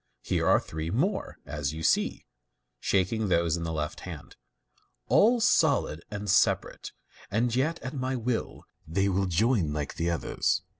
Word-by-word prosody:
Here - - 0
are - - +5
three 80 +1 -5
more, 145 - -1
as 75 0 -3
you 80 +1 -6
see - - +1 0.5
(shaking 100 +3 +1
those 85 -3 +2
in 85 - -4
the 85 -1 -3
left 75 -1 -3
hand), - - -9 0.7
all 235 +3 +5
solid 140 - +2
and 105 0 -5
separate, 90 - +1 0.4
and 115 +3 0
yet 155 +6 +1
at 130 - -5
my 130 -1 -2
will 120 -1 -3 0.2
they 95 +5 +1
will 95 0 +1
join 90 - +2
like 75 -2 -4
the 85 +1 0
others." 85 0 0
95 Hz, 155 wpm, -28 LUFS, 80-125 Hz, 0.7 s, are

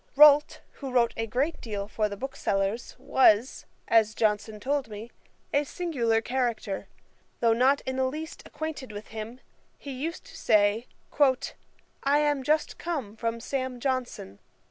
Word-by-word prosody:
Rolt, 295 +1 +7 0.2
who 270 -2 -4
wrote 240 -2 +3
a 225 0 -2
great 270 +9 -1
deal 205 -3 -4
for 215 0 -1
the 200 - -6
booksellers, 205 -3 -2
was, 240 -1 +3 0.2
as 220 -1 +4
Johnson 215 0 0
told 275 +3 -1
me, 215 +3 -8 0.4
a 285 - +3
singular 260 -10 0
character. 240 -5 -2 0.5
Though 230 -1 +4
not 260 +4 +3
in 260 0 -4
the 260 - +2
least 310 +5 -5
acquainted 300 -5 -5
with 205 0 -8
him, 225 +3 -7 0.4
he 280 - -8
used 305 - -5
to - - -13
say, 210 +2 +3 1.2
'I 280 +1 +4
am 295 -2 +2
just 305 +3 0
come 280 -12 -3
from 230 +1 -2
Sam. 255 0 -3
Johnson.' 245 - -3
250 Hz, 145 wpm, -27 LUFS, 220-280 Hz, 1.2 s, Rolt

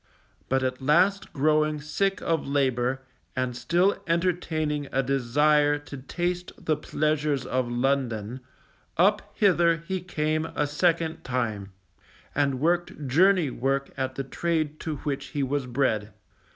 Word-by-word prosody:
But 135 0 +1
at 130 0 -2
last 180 +9 +3
growing 155 0 +2
sick 195 +7 -1
of 165 -4 0
labour, 130 -2 0 0.3
and 130 -1 -1
still 175 +10 +1
entertaining 165 -4 0
a 135 - +1
desire 145 +3 +3
to 145 -1 -10
taste 175 +6 -3
the 155 - 0
pleasures 150 -2 -1
of 130 -1 -1
London, 120 -2 -1 0.6
up 200 +5 +4
hither 175 -5 +4
he 190 -1 -2
came 155 -2 -1
a 150 - +1
second 165 +2 0
time, 110 -6 -2 0.6
and 140 -2 +1
worked 170 -1 0
journey 175 +1 +4
work 135 +3 -1
at 130 -1 -3
the 135 - -2
trade 155 +1 -2
to 160 -2 -3
which 140 -2 -2
he 140 - +2
was 135 0 -1
bred. 115 -5 0
145 Hz, 135 wpm, -26 LUFS, 130-165 Hz, 0.6 s, up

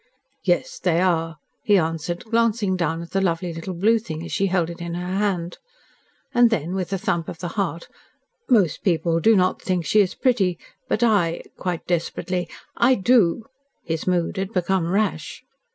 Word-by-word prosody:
"Yes, 175 -2 0
they 175 -2 +1
are," 165 -3 +1 0.2
he 205 -1 +4
answered, 165 +3 -2
glancing 225 -3 +1
down 165 -2 -1
at 170 - -12
the 195 - +1
lovely 175 -1 -1
little 165 +3 -6
blue 220 +6 +3
thing 160 -7 -6
as - - -8
she 195 - +1
held 175 -3 0
it 170 0 -10
in 170 0 -4
her 180 +2 -3
hand. 180 -4 -1 0.7
And 240 -1 +5
then, 175 -5 -1
with 185 -2 -3
a 195 - 0
thump 170 -2 -1
of - - -7
the 175 - -5
heart, 175 -4 -3 0.6
"Most 200 - +3
people 165 -2 +1
do 220 +5 +5
not 185 -1 +2
think 180 -3 -1
she 210 - +4
is 185 -2 -1
pretty, 195 -9 +1 0.3
but 225 - +1
I 195 -8 +2
" - - -43
quite 180 -3 -4
desperately 175 0 -2 0.3
"I 255 +2 +4
DO." 220 -2 +3 0.4
His 160 0 -3
mood 175 -1 0
had 195 +3 -3
become 180 -1 0
rash. 210 +2 -1
180 Hz, 185 wpm, -23 LUFS, 170-200 Hz, 0.7 s, And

